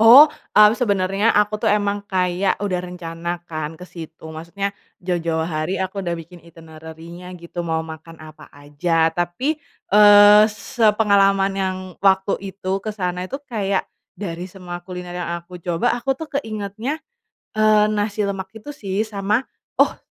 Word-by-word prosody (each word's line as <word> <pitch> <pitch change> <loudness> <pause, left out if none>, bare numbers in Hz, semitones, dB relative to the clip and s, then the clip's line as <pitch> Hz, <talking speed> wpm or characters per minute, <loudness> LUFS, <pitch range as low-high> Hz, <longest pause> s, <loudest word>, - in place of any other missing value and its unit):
Oh, 250 +7 +10 0.2
eee, 210 0 +8
sebenernya 200 -1 +1
aku 210 +1 +2
tuh 210 - +1
emang 205 -1 0
kayak 185 0 0
udah 190 -3 -1
rencana 170 -1 -5
kan 155 +1 -5
kesitu 165 -2 -10
maksudnya, 170 +5 -4 0.3
jauh-jauh 170 -2 -1
hari 155 +3 -2
aku 190 +1 -3
udah 175 - -1
bikin 170 +1 -9
itinerarinya 165 +2 -11
gitu 170 0 -6
mau 160 -1 0
makan 160 0 -10
apa 155 -1 -12
aja 160 +3 0
tapi, 175 - -1 0.3
eee, 205 0 +8
sepengalaman 200 -4 +3
yang 190 -1 -1 0.3
waktu 195 0 +4 0.2
itu 190 0 -2
kesana 180 -4 -3
itu 275 +10 -6
kayak, 200 -5 -1 0.3
dari 175 -3 -5
semua 175 -2 -8
kuliner 180 -1 -7
yang 175 -1 -3
aku 175 +1 -12
coba 170 -2 -1
aku 265 +3 0
tuh 310 +4 -8
keingetnya, 220 +5 -4 0.6
eee, 215 -1 +5
nasi 210 0 -1
lemak 195 -1 -3
itu 220 +6 -10
sih 200 -8 -3
sama, 210 +1 0 0.4
oh, - - +3
190 Hz, 145 wpm, -21 LUFS, 170-210 Hz, 0.6 s, Oh